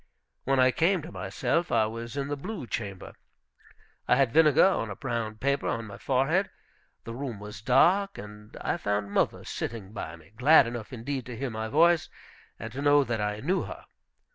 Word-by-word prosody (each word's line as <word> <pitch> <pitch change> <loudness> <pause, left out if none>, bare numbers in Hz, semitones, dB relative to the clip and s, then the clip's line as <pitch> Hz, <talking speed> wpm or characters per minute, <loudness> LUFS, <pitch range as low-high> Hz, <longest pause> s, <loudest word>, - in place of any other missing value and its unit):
When 135 0 +2
I 130 0 +5
came 170 +4 +1
to 165 - -9
myself 170 0 -1
I 110 - +3
was 115 +4 -6
in 140 -1 -2
the 145 - -2
blue 185 - -6
chamber; 100 -5 -5 0.9
I - - +5
had 135 -4 +2
vinegar 155 -1 +6
on 115 - 0
a 100 - -5
brown 115 -3 -3
paper 140 +5 -1
on 115 -1 -2
my 100 -2 -10
forehead; 150 +9 +1 0.5
the 115 - -7
room 125 -4 -5
was 105 -2 -9
dark, 180 - +3
and 105 +1 -11
I - - -1
found 100 0 -2
mother - - 0
sitting 105 -3 -5
by 85 -6 -6
me, 80 +2 -19
glad 140 +5 +6
enough 115 -2 -6
indeed 130 +1 -4
to 120 -2 -7
hear 135 0 -3
my 110 0 -4
voice, 165 +3 +3 0.5
and 110 +1 -7
to 135 - -4
know 145 0 +5
that 115 -4 -2
I 105 0 -2
knew 180 +7 +1
her. - - -8
125 Hz, 190 wpm, -28 LUFS, 110-145 Hz, 0.9 s, vinegar